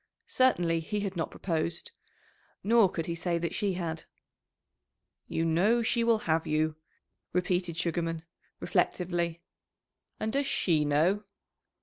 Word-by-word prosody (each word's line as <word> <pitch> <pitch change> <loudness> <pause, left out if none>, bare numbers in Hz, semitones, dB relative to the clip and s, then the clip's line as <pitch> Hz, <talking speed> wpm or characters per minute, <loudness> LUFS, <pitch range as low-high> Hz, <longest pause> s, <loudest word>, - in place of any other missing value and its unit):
Certainly 175 -11 +2
he 205 +6 -3
had 195 -2 -3
not 165 - -1
proposed; 170 -1 -2 0.7
nor 225 -2 +5
could 165 -2 -3
he 170 - -2
say 170 +1 -1
that 170 0 -2
she 200 -2 0
had. 165 -3 -4 1.2
"You 165 - -1
know 200 +9 +3
she 235 +1 +1
will 230 -1 +4
have 160 0 +1
you," 155 0 +1 0.6
repeated 180 -1 0
Sugarman, 165 -1 -1 0.4
reflectively. 170 -2 0 0.8
"And 220 +1 -2
does 280 0 +1
she 160 - +2
know?" 170 +9 +2
170 Hz, 125 wpm, -29 LUFS, 165-200 Hz, 1.2 s, nor